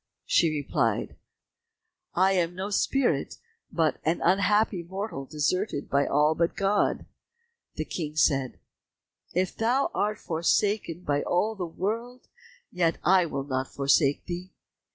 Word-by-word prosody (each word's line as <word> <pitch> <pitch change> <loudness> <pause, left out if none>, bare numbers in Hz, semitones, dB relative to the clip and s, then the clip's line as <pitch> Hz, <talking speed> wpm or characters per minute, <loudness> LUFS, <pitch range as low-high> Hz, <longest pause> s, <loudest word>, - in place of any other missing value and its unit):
She 165 - +3
replied, 150 -2 -1 1.0
"I 190 +2 +4
am 175 -2 0
no 190 +3 -4
spirit, 270 +5 +1 0.4
but 160 -4 +1
an 160 +2 +1
unhappy 200 +1 +2
mortal 190 -4 -5
deserted 150 +3 -2
by 140 0 +2
all 150 +2 +3
but 165 +1 0
God." 200 +1 +1 0.7
The - - -3
King 155 -3 -5
said, 135 -5 +1 0.8
"If 185 +1 0
thou 245 +5 +1
art 210 +1 0
forsaken 170 +2 0
by 145 -4 0
all 205 +5 0
the 185 -5 -4
world, 230 +9 -4 0.4
yet 170 -2 +1
will 175 - +3 0.3
I - - -16
not 130 0 -1
forsake 140 +1 +2
thee." 180 +1 -5
175 Hz, 130 wpm, -27 LUFS, 155-200 Hz, 1.0 s, I